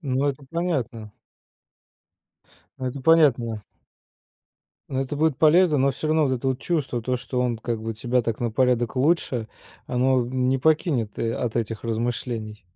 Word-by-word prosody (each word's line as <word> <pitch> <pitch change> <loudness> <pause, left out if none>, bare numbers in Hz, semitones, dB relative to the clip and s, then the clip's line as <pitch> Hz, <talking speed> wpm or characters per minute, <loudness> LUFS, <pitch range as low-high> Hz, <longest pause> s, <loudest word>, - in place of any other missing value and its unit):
Ну, 135 -3 -1
это 140 +1 -4
понятно. 130 -11 -2 1.7
Это 130 +1 -4
понятно. 125 -9 +3 1.3
Ну, 130 - -2
это 135 +2 -3
будет 155 -2 +2
полезно, 160 -1 +5
но 135 +1 +3
всё 135 - -5
равно 155 -1 +3
вот 130 - 0
это 125 - -5
вот 130 -1 0
чувство, 140 -8 -1
то, 125 +2 0
что 125 +1 -3
он 120 -2 0
как 115 0 -3
бы 115 0 -3
тебя 120 +3 0
так 115 -1 -2
на 120 -2 -2
порядок 125 -1 +1
лучше, 130 -5 +1 0.4
оно, 130 +1 +2
м, 125 +1 -1
не 135 +1 +2
покинет, 150 - +1
э, 115 0 0
от 120 -2 -3
этих 115 -2 -2
размышлений. 115 -2 -3
125 Hz, 160 wpm, -24 LUFS, 115-145 Hz, 1.7 s, полезно